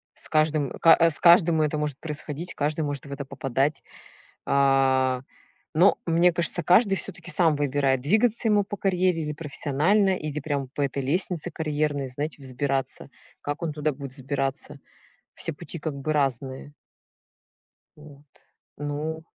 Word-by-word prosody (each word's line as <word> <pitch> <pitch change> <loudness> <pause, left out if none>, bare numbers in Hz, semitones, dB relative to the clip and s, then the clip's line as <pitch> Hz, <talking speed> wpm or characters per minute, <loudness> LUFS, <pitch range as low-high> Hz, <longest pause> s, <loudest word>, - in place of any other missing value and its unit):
с - - -7
каждым, 155 -3 +1
э 165 0 +7
с 150 - -5
каждым 170 -2 +6
это 150 0 0
может 150 -2 -3
происходить, 155 +1 -5
каждый 150 +2 -1
может 145 -2 -3
в - - -10
это 140 0 -6
попадать. 135 +1 -1 0.6
А, 135 -2 +3 0.5
но, 175 +5 +5
мне 170 +1 +3
кажется, 170 0 0
каждый 195 +4 +4
всё-таки 180 - -3
сам 160 -2 +3
выбирает, 140 -2 +1
двигаться 220 - +2
ему 210 -1 +3
по 205 - -6
карьере 180 -4 +1
или 150 0 -3
профессионально 165 +6 +1
или 150 -1 -4
прям 140 -2 -3
по 145 - -5
этой 140 0 -1
лестнице 175 +3 -1
карьерной, 150 -3 -2
знаете, 145 +3 -5
взбираться. 135 +1 -2 0.3
Как 145 +3 -4
он 160 - -1
туда 150 0 -1
будет 135 -1 -8
взбираться? 135 +1 -3 0.6
Все 165 - 0
пути 170 +3 -8
как 150 -2 -4
бы 145 +3 -2
разные. 135 0 -2 1.2
Вот, 150 -1 -15 0.5
ну 150 +2 -4
150 Hz, 145 wpm, -25 LUFS, 140-165 Hz, 1.2 s, э